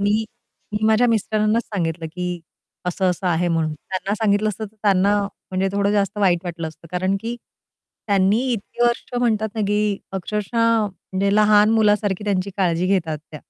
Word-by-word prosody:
मी 210 +2 +2 0.5
मी 210 - 0
माझ्या 220 +3 +4
मिस्टरांनाच 215 0 +1
सांगितलं 165 -4 -3
की, 180 0 -4 0.5
"असं-असं 180 +1 0
आहे." 175 0 +1
म्हणून 165 -2 0
त्यांना 190 +6 -4
सांगितलं 215 -1 +1
असतं, 215 +1 -4
तर 215 +1 -12
त्यांना 200 0 +3 0.3
म्हणजे 190 +1 0
थोडं 200 0 +1
जास्त 205 0 0
वाईट 185 -4 +3
वाटलं 170 -2 -4
असतं. 160 +1 -15
कारण 185 +2 0
की 230 +2 -4 0.7
त्यांनी 200 0 +3
इतकी 230 +1 -4
वर्ष 240 0 +1
म्हणतात 220 -3 +1
ना, 220 - -2
की 205 0 +1
अक्षरशः 215 +3 0
म्हणजे 195 +1 -2
लहान 210 0 +5
मुलासारखी 210 -2 +2
त्यांची 200 -1 0
काळजी 180 -2 +1
घेतात 165 -5 0
त्या. 150 - -8
200 Hz, 160 wpm, -21 LUFS, 185-215 Hz, 0.7 s, लहान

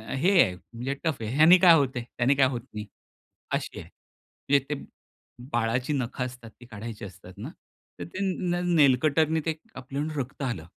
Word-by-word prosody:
हे 165 +9 +2
आहे 90 - +2
म्हणजे 120 +8 -6
टफ 160 -5 0
आहे. 110 - -3
ह्याने 160 +5 +8
काय 175 -2 +8
होतंय 130 -5 0
त्याने 125 +4 +3
काय 135 -1 +4
होत 125 -2 -3
नाही 105 -1 -5 0.7
अशी - - -3
आहे. - - -11 0.6
म्हणजे 140 -1 +4
ते 150 - -1 0.8
बाळाची 120 +4 0
नखं 125 -1 -2
असतात 125 -2 -9
ती - - -11
काढायची 110 -1 -7
असतात 95 -1 -12
ना. 110 +8 -6 0.5
तर - - -4
ते 185 - -5 0.3
न 175 - +1 0.2
नेलकटरने 155 +2 +4
ते 160 - +1 0.2
कापून 140 +4 -4
रक्त 135 +1 -5
आलं. 110 -12 -3
130 Hz, 170 wpm, -27 LUFS, 115-150 Hz, 0.8 s, ह्याने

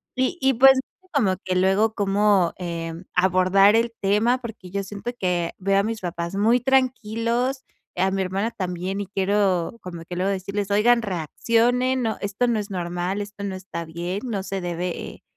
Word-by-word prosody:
Y 260 +7 0
y 265 0 +4
pues, 265 +2 +7
y 370 +7 -12
como 200 -10 +2
que 185 -1 -1
luego 195 +4 +3
cómo, 200 -3 +2
eh, 170 -2 -4 0.2
abordar 190 +3 +4
el 230 0 +1
tema, 215 +6 +2
porque 210 -6 -9
yo 200 0 -2
siento 205 +4 -5
que 175 -2 0
veo 195 +1 +2
a - - +2
mis 225 0 -3
papás 170 +1 -4
muy 225 +4 +3
tranquilos, 250 0 0 0.3
a 190 +1 +2
mi 195 0 0
hermana 195 +5 -2
también, 185 +1 -3
y - - -3
quiero 195 0 0
como 170 -2 -8
que 175 - -7
luego 190 +2 0
decirles: 200 +1 -3
"Oigan, 235 +3 +4
reaccionen, 230 - +1
no, 220 -1 -1
esto 205 +5 0
no 230 -2 +1
es 205 0 -6
normal, 180 +2 -2
esto 205 0 -8
no 195 - -3
está 185 -3 -6
bien", 175 +5 -4
no 205 -5 -3
se 195 0 -4
debe 175 0 -4
200 Hz, 180 wpm, -23 LUFS, 185-230 Hz, 0.3 s, pues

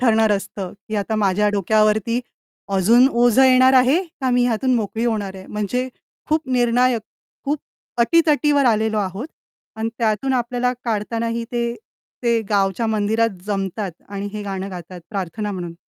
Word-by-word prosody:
ठरणार 225 -3 +3
असतं, 195 -2 -4 0.2
की 215 - -2
आता 205 +2 -1
माझ्या 205 0 +2
डोक्यावरती 215 +3 +2 0.6
अजून 230 +7 +5
ओझं 240 0 +4
येणार 260 0 +6
आहे 260 +8 +4 0.2
का 260 -1 0
मी 245 0 +3
ह्यातून 250 +2 +1
मोकळी 225 0 -1
होणार 210 -5 -1
आहे? 190 0 -10
म्हणजे 215 +5 -2 0.4
खूप 310 -1 0
निर्णायक 245 0 +2 0.4
खूप 290 +2 0 0.4
अटी-तटीवर 295 +1 +3
आलेलो 220 -1 +2
आहोत. 200 - -3 0.5
आणि 220 +1 -2
त्यातून 225 +3 0
आपल्याला 245 0 0
काढतानाही 230 +1 -2
ते 235 0 -1 0.5
ते 235 -1 +2
गावच्या 200 +2 +1
मंदिरात 220 -1 0
जमतात 195 -1 -2 0.2
आणि 200 0 -5
हे 210 -1 -5
गाणं 195 -1 -4
गातात 180 0 -9
प्रार्थना 205 +1 -3
म्हणून. 175 -3 -6
220 Hz, 145 wpm, -21 LUFS, 205-245 Hz, 0.6 s, येणार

